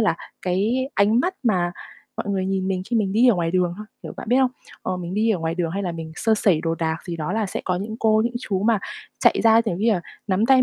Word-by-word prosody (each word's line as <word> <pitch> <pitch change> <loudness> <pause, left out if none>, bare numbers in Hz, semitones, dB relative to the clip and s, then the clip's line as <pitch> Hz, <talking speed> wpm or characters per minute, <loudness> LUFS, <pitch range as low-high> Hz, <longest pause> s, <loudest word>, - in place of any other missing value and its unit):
là 205 -7 +2 0.3
cái 215 +9 0
ánh 215 +4 +4
mắt 370 +6 0
mà 180 -7 +1 0.4
mọi - - -4
người 190 -1 0
nhìn 190 0 -1
mình 185 -1 -1
khi 240 - +2
mình 200 -4 +1
đi 240 +4 +5
ở 230 - +6
ngoài 170 -2 0
đường 180 -1 +1
thôi, 215 - -8 0.2
kiểu, - - -7
bạn - - -7
biết 245 - +4
không? 260 -1 +3 0.3
Ờ, 185 - -2
mình 180 +1 -5
đi 220 +2 +2
ở 205 - +1
ngoài 165 0 -2
đường, 170 -2 -1
hay 200 +3 -2
là 180 -3 -2
mình 160 -1 -7
sơ 225 -1 +2
sẩy 190 -6 +2
đồ 165 0 -1
đạc 160 -1 -1
gì 175 -2 -4
đó 155 +2 -3
là 220 -1 0
sẽ - - -4
có 185 - 0
những 215 +4 -4
cô, 220 -1 +4
những 240 +1 -2
chú 195 -6 -2
mà 220 -1 +3 0.4
chạy - - +4
ra, 225 0 +7
giống 180 -4 -1
như 225 +2 +3
là, 180 - 0 0.3
nắm 200 +2 +2
tay 260 0 +6
195 Hz, 280 wpm, -23 LUFS, 175-220 Hz, 0.4 s, ra